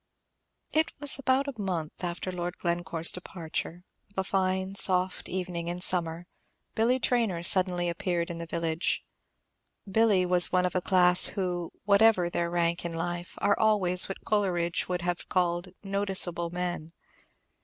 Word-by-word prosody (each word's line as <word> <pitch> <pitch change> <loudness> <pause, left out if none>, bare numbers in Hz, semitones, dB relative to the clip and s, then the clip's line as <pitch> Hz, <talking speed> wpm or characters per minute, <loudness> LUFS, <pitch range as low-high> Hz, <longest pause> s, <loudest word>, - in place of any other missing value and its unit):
It 315 +1 +1
was 285 -1 +2
about 270 +1 +1
a 250 -6 -6
month 175 -4 -4
after 175 +1 -3
Lord 175 0 -5
Glencore's 170 -1 0
departure, 175 -1 -6 0.3
of 200 - -28
a 190 - +1
fine, 190 0 -1
soft 185 -1 +2
evening 180 -2 -4
in 175 +1 -4
summer, 175 -2 0 0.5
Billy 235 +3 +2
Traynor 230 -9 0
suddenly 180 -1 +2
appeared 170 0 -2
in 170 - -7
the 170 - -6
village. 165 0 -1 0.8
Billy 200 -2 +3
was 180 0 +3
one 180 0 +2
of 180 - -1
a 185 - 0
class 180 -1 +5
who, 180 -3 -3
whatever 200 -3 +4
their 170 0 -1
rank 170 0 0
in 170 -1 -4
life, 175 +1 -4
are 200 - +2
always 195 -5 +2
what 195 - -7
Coleridge 180 -5 0
would 180 -1 -2
have 175 0 -3
called 175 0 0 0.2
"noticeable 195 -4 +1
men." 175 -2 -4
180 Hz, 150 wpm, -28 LUFS, 175-195 Hz, 0.8 s, class